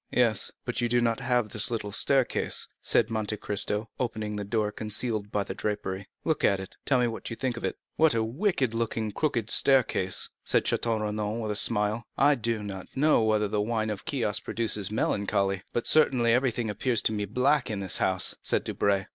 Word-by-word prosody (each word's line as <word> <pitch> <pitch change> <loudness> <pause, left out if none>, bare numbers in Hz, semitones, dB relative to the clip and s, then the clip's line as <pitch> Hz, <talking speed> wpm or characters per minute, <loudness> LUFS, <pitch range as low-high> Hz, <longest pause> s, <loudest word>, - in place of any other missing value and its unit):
"Yes, 115 -5 +2
but 120 0 -2
you 120 - 0
have 120 0 +2
not 120 -1 0
this 110 +1 +1
little 110 -3 -3
staircase," 135 +4 +1
said 115 -1 +2
Monte 110 -1 -2
Cristo, 105 +1 0
opening 110 -4 -3
a - - -3
door 105 0 -1
concealed 105 0 -1
by 105 - 0
the - - -6
drapery. 100 -2 -4 0.2
"Look 160 -2 0
at 100 - +3
it, 95 - -8
and - - -24
tell 130 -3 +3
me 120 - +2
what 115 - -5
you 115 - -5
think 130 0 -2
of - - -8
it." - - -2 0.2
"What 155 -5 +4
a 115 - +1
wicked 130 - 0
looking, 115 -2 -2
crooked 120 -3 -1
staircase," 125 -9 +3
said - - +3
Château 115 -2 0
Renaud 105 +1 -2
with 105 - -2
a - - -2
smile. 105 +1 +1
"I 145 +2 +5
do 115 -4 -2
not 95 -2 -7
know 150 -2 +4
whether 110 -1 +2
the 105 0 -1
wine 110 0 -1
of 100 - -6
Chios 115 -7 0
produces 105 -4 -1
melancholy, 100 -3 0
but 120 - -2
certainly 125 -7 +4
everything 120 -2 +1
appears 115 +1 0
to - - +2
me 105 -1 -2
black 125 +5 +1
in 105 -3 -3
this 95 -2 -1
house," 95 -1 +1
said - - +1
Debray. 100 -1 0
110 Hz, 200 wpm, -27 LUFS, 105-120 Hz, 0.2 s, I